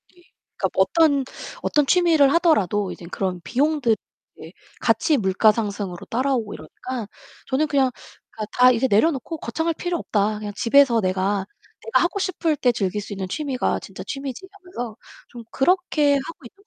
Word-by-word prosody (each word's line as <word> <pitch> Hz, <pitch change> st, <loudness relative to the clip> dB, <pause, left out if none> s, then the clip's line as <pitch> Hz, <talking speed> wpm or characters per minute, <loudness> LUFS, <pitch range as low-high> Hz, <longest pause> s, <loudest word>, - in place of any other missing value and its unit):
예. 355 Hz, -, -22 dB, 0.4 s
그러니까 -, -, 0 dB
뭐 -, -, +4 dB
어떤 310 Hz, -5 st, +3 dB, 0.4 s
어떤 295 Hz, -1 st, +2 dB
취미를 320 Hz, -3 st, +4 dB
하더라도 210 Hz, -, +2 dB
이젠 170 Hz, 0 st, -10 dB
그런 185 Hz, -2 st, -3 dB
비용들 275 Hz, -, +1 dB, 0.5 s
예 -, -, -10 dB, 0.3 s
같이 310 Hz, -, +2 dB
물가 200 Hz, 0 st, +4 dB
상승으로 200 Hz, -5 st, -4 dB
따라오고 245 Hz, -3 st, -1 dB
이러니까 250 Hz, -5 st, -7 dB, 0.4 s
저는 285 Hz, +4 st, +1 dB
그냥 275 Hz, -3 st, +2 dB, 0.5 s
가 215 Hz, -, -3 dB
다 250 Hz, 0 st, +6 dB
이제 250 Hz, +2 st, +1 dB
내려놓고 275 Hz, +8 st, +1 dB
'거창할 320 Hz, +6 st, -2 dB
필요 350 Hz, +1 st, -2 dB
없다. 210 Hz, -6 st, -1 dB
그냥 210 Hz, -1 st, -5 dB
집에서 255 Hz, -1 st, +4 dB
내가 190 Hz, 0 st, 0 dB, 0.4 s
내가 460 Hz, -, +2 dB
하고 355 Hz, +3 st, -1 dB
싶을 335 Hz, -5 st, -1 dB
때 250 Hz, -2 st, +3 dB
즐길 200 Hz, -2 st, -1 dB
수 205 Hz, -, -7 dB
있는 190 Hz, -2 st, -5 dB
취미가 275 Hz, +2 st, -1 dB
진짜 -, -, -9 dB
취미지.'하면서 280 Hz, -, -7 dB, 0.3 s
좀 240 Hz, -1 st, -10 dB
그렇게 305 Hz, -2 st, +2 dB
하고 290 Hz, +6 st, -4 dB
있는 395 Hz, -, -16 dB
260 Hz, 355 characters per minute, -22 LUFS, 210-315 Hz, 0.5 s, 다